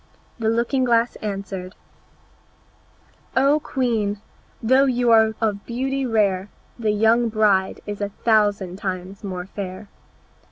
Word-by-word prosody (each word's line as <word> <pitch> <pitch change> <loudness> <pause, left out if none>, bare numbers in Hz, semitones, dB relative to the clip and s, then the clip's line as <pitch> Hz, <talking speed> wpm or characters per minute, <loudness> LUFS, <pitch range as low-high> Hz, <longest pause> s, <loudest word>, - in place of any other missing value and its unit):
The 220 -1 +1
looking 235 +4 +1
glass 235 -1 +2
answered, 195 -2 -5 1.6
"O 280 +3 +4
Queen, 225 -8 -1 0.4
although 260 +4 +5
you 245 -2 +2
are 220 -1 +5
of 210 -3 -1
beauty 265 +2 -2
rare, 205 -4 +1 0.3
The 220 -2 0
young 225 +3 +3
bride 205 -3 +2
is 205 0 -6
a 205 - -1
thousand 205 -4 +1
times 190 0 -5
more 185 -3 -5
fair." 195 +1 -7
215 Hz, 120 wpm, -22 LUFS, 200-235 Hz, 1.6 s, although